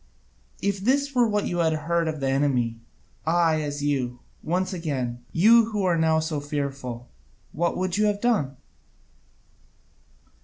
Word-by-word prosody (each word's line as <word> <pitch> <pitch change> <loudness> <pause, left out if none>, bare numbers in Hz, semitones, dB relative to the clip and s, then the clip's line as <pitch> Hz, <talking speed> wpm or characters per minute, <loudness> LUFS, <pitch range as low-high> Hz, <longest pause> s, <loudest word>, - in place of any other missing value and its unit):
If 200 0 0
this 280 +7 +1
were 245 -2 +4
what 210 -1 0
you 175 - -2
had 160 -1 +2
heard 165 +2 0
of 155 -1 -3
the 135 - 0
enemy, 130 -4 +1 0.4
I 165 -1 +2
as 145 -1 -4
you, 130 -4 -1 0.2
once 185 +4 -1
again, 130 -8 -3
you 225 +6 +6
who 215 -3 -2
are 180 -2 +2
now 160 -1 +3
so 155 -1 -2
fearful 135 -4 -4 0.4
what 170 +3 -1
would 185 0 -1
you 210 - +3
have 205 -1 0
done? 205 - 0
160 Hz, 150 wpm, -25 LUFS, 140-190 Hz, 0.4 s, you